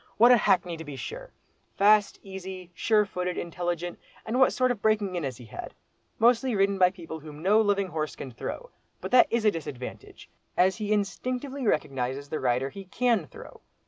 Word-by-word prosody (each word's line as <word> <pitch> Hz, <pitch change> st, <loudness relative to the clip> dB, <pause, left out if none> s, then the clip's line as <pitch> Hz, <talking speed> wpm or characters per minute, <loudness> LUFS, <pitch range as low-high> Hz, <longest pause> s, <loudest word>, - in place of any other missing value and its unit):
What 240 Hz, +3 st, +7 dB
a -, -, +9 dB
hackney 180 Hz, -5 st, +2 dB
to 160 Hz, -, -7 dB
be 145 Hz, -3 st, -8 dB
sure!—fast, 215 Hz, -, 0 dB
easy, 190 Hz, -2 st, -8 dB
sure 210 Hz, +3 st, +2 dB
footed, 180 Hz, -2 st, -3 dB
intelligent—and 175 Hz, +7 st, -4 dB
what 260 Hz, -, +6 dB
sort 255 Hz, -1 st, +2 dB
of 230 Hz, -4 st, -4 dB
breaking 210 Hz, -3 st, +1 dB
in 175 Hz, -, -2 dB
has 130 Hz, -4 st, -4 dB
he 120 Hz, -, -12 dB
had? 110 Hz, -, -8 dB, 0.4 s
Mostly 240 Hz, +1 st, +3 dB
ridden 195 Hz, 0 st, +2 dB
by 180 Hz, -1 st, +6 dB
people 170 Hz, -4 st, -8 dB
whom 150 Hz, 0 st, -11 dB
no 210 Hz, +4 st, +5 dB
living 200 Hz, -2 st, +1 dB
horse 155 Hz, -3 st, -3 dB
can 135 Hz, -, -7 dB
throw; -, -, -6 dB, 0.3 s
but -, -, -6 dB
that 250 Hz, -1 st, +7 dB
is 235 Hz, -1 st, 0 dB
a 210 Hz, -, +6 dB
disadvantage—as 160 Hz, -, -3 dB
he 210 Hz, -1 st, -3 dB
instinctively 250 Hz, +6 st, -2 dB
recognises 135 Hz, -3 st, -1 dB
the 155 Hz, -, -2 dB
rider 125 Hz, +1 st, +1 dB
he 195 Hz, +4 st, -9 dB
can 225 Hz, -3 st, +1 dB
throw. -, -, -13 dB
190 Hz, 175 wpm, -27 LUFS, 160-220 Hz, 0.4 s, a